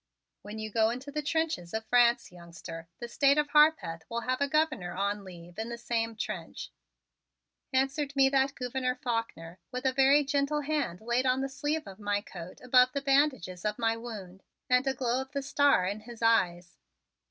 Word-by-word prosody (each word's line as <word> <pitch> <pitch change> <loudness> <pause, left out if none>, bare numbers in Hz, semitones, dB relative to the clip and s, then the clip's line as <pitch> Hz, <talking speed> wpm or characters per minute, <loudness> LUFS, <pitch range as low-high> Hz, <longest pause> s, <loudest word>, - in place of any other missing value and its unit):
"When 210 +1 -8
you 215 0 -5
go 220 +1 +3
into 255 +5 -5
the 300 +1 -2
trenches 290 - -2
of 220 0 -3
France, 240 -1 +3
youngster, 170 -1 -10
the 240 - -6
State 280 +4 +3
of 295 -1 +1
Harpeth 300 - +3
will 235 0 -2
have 255 +3 -2
a 285 - +3
Governor 280 - 0
on 200 +2 -2
leave 175 0 -11
in 225 +1 -3
the 235 - -5
same 230 -1 -2
trench," 215 - -6 1.0
answered 270 +2 0
me 270 -1 +5
that 270 0 +1
Gouverneur 255 0 -2
Faulkner 230 -9 -4
with 250 +1 -5
a 260 - +2
very 275 +2 +5
gentle 285 +1 0
hand 285 - -2
laid 240 +3 0
on 255 +1 +2
the 270 - -1
sleeve 290 +3 -2
of 195 +1 -11
my 205 -1 0
coat 180 -3 -10
above 250 0 +4
the 280 - -1
bandages 270 - +1
of 210 0 -1
my 225 -1 +1
wound, 205 -5 -8 0.3
and 250 +1 +3
a 270 - +1
glow 250 0 0
of 265 +1 -10
the 280 -1 -2
star 285 -8 +3
in 200 +3 -2
his 230 +1 -10
eyes. 175 -6 +2
245 Hz, 190 wpm, -29 LUFS, 205-275 Hz, 1.0 s, me